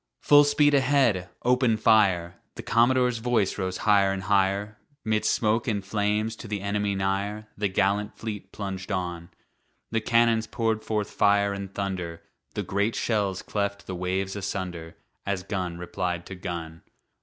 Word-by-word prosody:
"Full 145 0 +7
speed 145 0 +3
ahead! 130 -10 +3
Open 125 -2 +3
fire!" 95 -6 +3 0.2
The - - -7
commodore's 125 0 +3
voice 110 -4 0
rose 95 -1 -2
high'r 100 -2 +3
and 95 -1 -3
high'r, 100 +2 +1 0.3
'Midst 110 -1 +1
smoke 110 +1 +1
and 100 -4 -1
flames 105 +2 0
to 115 - -9
the 105 -2 -3
enemy 100 0 -1
nigh'r, 100 +2 -2
The 105 0 0
gallant 100 +2 0
fleet 105 -3 -6
plunged 95 -1 -5
on. 85 -2 -3 0.6
The 115 0 0
cannons 115 -1 +3
poured 110 -2 -1
forth 105 -2 -2
fire 100 0 +3
and 100 -1 -6
thunder, 90 -4 -4 0.3
The - - -1
great 100 +3 0
shells 100 -4 -1
cleft 100 -1 -3
the 95 - -5
waves 95 +2 -2
asunder, 90 -4 -5 0.3
As 100 -2 -2
gun 90 -4 -3
replied 90 0 -3
to 95 - -8
gun. 85 -3 -6
100 Hz, 155 wpm, -26 LUFS, 95-110 Hz, 0.6 s, Full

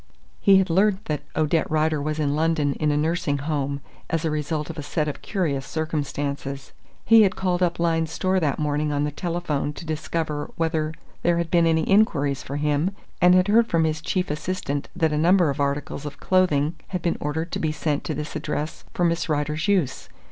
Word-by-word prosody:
He 195 - +6
had 190 -2 +2
learnt 200 +3 +2
that 150 -2 -2
Odette 155 +1 +1
Rider 155 -1 +1
was 155 +1 -2
in 145 -2 0
London 155 -2 +1
in 155 +1 0
a 145 - +2
nursing 160 -1 0
home, 140 -1 -2 0.3
as 165 -1 -1
the 160 - 0
result 150 +1 -2
of 160 - -8
a - - -2
set 150 +1 -1
of 150 - -5
curious 155 -10 -1
circumstances. 140 -3 -3 0.3
He 225 -1 +7
had 195 -3 +3
called 185 -1 0
up 175 -1 +1
Lyne's 165 -1 +1
Store 185 +3 0
that 150 -6 0
morning 150 0 0
on 145 0 0
the 150 - -1
telephone 165 -3 -2
to 165 - -9
discover 155 -1 -3
whether 160 -1 -1 0.3
there 170 0 +2
had 170 -1 -2
been 170 -1 +4
any 160 -1 +2
inquiries 145 -10 +3
for 140 - -6
him 150 +6 0 0.3
and 180 0 +7
had 185 +1 +4
heard 225 +3 +4
from 165 -5 +2
his 155 0 0
chief 180 0 -1
assistant 150 -2 -3
that 160 -3 +1
a 150 - +1
number 175 -1 +4
of 140 - -6
articles 140 0 -2
of 145 0 -9
clothing 165 -4 +2
had 180 -3 -4
been 170 - 0
ordered 160 +3 -3
to - - -2
be 155 - 0
sent 150 -1 -1
to 155 - -2
this 150 +1 -5
address 150 +1 -3
for 175 - 0
Miss 170 0 0
Rider's 150 +1 -1
use. 190 -10 0
155 Hz, 205 wpm, -24 LUFS, 145-175 Hz, 0.3 s, He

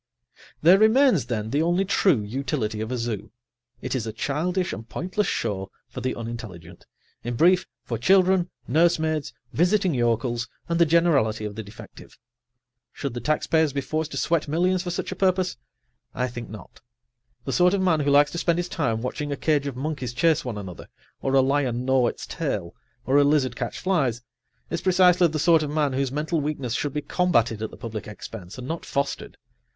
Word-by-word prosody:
There 180 +5 +7
remains, 220 - +4
then, 110 -2 -3
the 145 - +1
only 175 +4 +2
true 180 - +2
utility 110 -1 -3
of 110 +2 -4
a 125 - -1
zoo: 115 -3 -4 0.5
it - - -3
is 115 -4 -2
a - - -3
childish 170 - -1
and 110 +4 -8
pointless 185 +5 -2
show 95 -1 -2 0.2
for - - -7
the 130 - -2
unintelligent, 110 -8 -8 0.4
in 120 0 -3
brief, 180 +7 +4 0.2
for 115 -3 -4
children, 185 +4 +4 0.2
nursemaids, 160 -2 +2 0.2
visiting 180 +1 +2
yokels 120 -1 0 0.2
and 170 0 0
the 170 - +5
generality 140 -10 +2
of 105 - -4
the 110 - -5
defective. 105 0 -13 0.7
Should 140 -4 -5
the 120 - -4
taxpayers 155 +1 +1
be 140 - -1
forced 155 +3 -2
to - - -4
sweat 165 -3 +1
millions 180 +4 +1
for 180 - -5
such 175 - -3
a - - -4
purpose? 185 -1 +1 0.6
I 125 - 0
think 120 -1 -7
not. 105 -4 -12 0.6
The 135 - -2
sort 180 +2 +4
of 195 - 0
man 170 -4 +3
who 145 -1 +1
likes 145 +1 +5
to 170 - -3
spend 170 0 +1
his 175 0 -2
time 115 -7 -1
watching 145 +3 -3
a 140 - -2
cage 145 -2 +1
of 140 - -4
monkeys 135 -3 -4
chase 160 +4 +2
one 120 -4 -4
another, 95 -4 -8 0.3
or 135 0 0
a 135 - +6
lion 130 -3 0
gnaw 130 -2 +3
its - - -4
tail, 105 - -3 0.3
or 135 +2 +3
a - - +6
lizard 140 -4 +2
catch 120 0 -4
flies, 135 - 0 0.5
is - - -2
precisely 180 -1 +5
the 155 -1 -3
sort 165 +1 +4
of 150 - -2
man 150 -2 0
whose 135 -1 -1
mental 155 +3 -1
weakness 140 -5 -3
should 145 +4 -1
be 150 +1 -3
combatted 115 - +1
at 110 - -3
the - - -13
public 110 -2 -6
expense, 105 -2 -9
and 125 0 -7
not 165 +2 -4
fostered. 140 0 -3
140 Hz, 195 wpm, -24 LUFS, 120-170 Hz, 0.7 s, There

